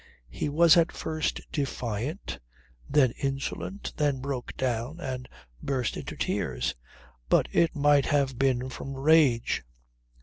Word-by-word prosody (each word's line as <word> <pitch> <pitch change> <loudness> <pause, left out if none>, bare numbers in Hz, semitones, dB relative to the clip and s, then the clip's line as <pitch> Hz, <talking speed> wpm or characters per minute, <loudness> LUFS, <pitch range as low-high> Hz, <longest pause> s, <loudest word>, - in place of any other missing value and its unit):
He 145 - -2
was 165 +3 +6
at 170 0 +4
first 155 -1 -2
defiant, 125 - -3 0.5
then 130 -5 +4
insolent, 135 +8 -3
then 145 -3 +1
broke 130 -2 -5
down 125 +5 -2
and 130 -5 -5 0.3
burst 130 -4 -1
into - - -6
tears; 60 -1 -1 0.6
but - - +4
it 170 0 +2
might 145 -1 +4
have 135 -4 +1
been 130 -2 +2
from 135 +1 -6
rage. 140 - +3
135 Hz, 125 wpm, -28 LUFS, 125-150 Hz, 0.6 s, was